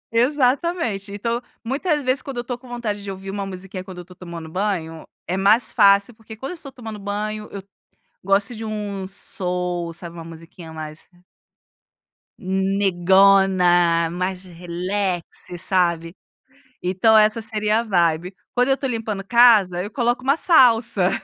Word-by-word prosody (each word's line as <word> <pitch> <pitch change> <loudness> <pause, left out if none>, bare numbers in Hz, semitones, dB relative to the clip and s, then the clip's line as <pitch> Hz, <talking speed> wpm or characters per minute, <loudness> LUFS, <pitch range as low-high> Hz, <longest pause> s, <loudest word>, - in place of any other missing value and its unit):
Exatamente, 255 - +1
então, 230 +4 -2 0.2
muitas 295 +4 -1
vezes 255 +2 +1
quando 270 -3 -7
eu 240 - -2
tô 245 0 -4
com 250 +1 -16
vontade 220 -4 -4
de 200 - -6
ouvir 195 0 -6
uma 200 -1 -4
musiquinha, 185 0 -7
quando 185 -1 -11
eu 180 - -6
estou 180 +1 -16
tomando 170 -2 -8
banho, 165 -3 -3 0.2
é 180 - -1
mais 205 +5 +3
fácil, 200 +3 +5
porque 220 0 -12
quando 270 +8 -6
eu - - -5
estou 295 -5 -9
tomando 225 -5 -8
banho, 210 +1 -4
eu 200 -1 -7 0.6
gosto 200 +4 +1
de 225 - -7
um 205 -3 -4
soul, 180 -3 -3
sabe, 170 0 -9
uma 165 - -8
musiquinha 165 0 -12
mais 155 0 -8 1.3
"negona", 190 -2 +3
mais 185 +1 -3
relax, 180 +1 -3 0.3
sabe. 170 -2 0 0.7
Então 190 +5 +4
essa 215 +1 +3
seria 215 0 0
a - - -1
vibe. 175 -3 +1 0.2
Quando 250 0 +2
eu 270 - +5
estou 270 -1 -3
limpando 220 -4 -3
casa, 215 -6 +5
eu 205 - -6
coloco 240 +1 0
uma 275 +4 +2
salsa. 235 - +4
200 Hz, 155 wpm, -21 LUFS, 180-230 Hz, 1.3 s, fácil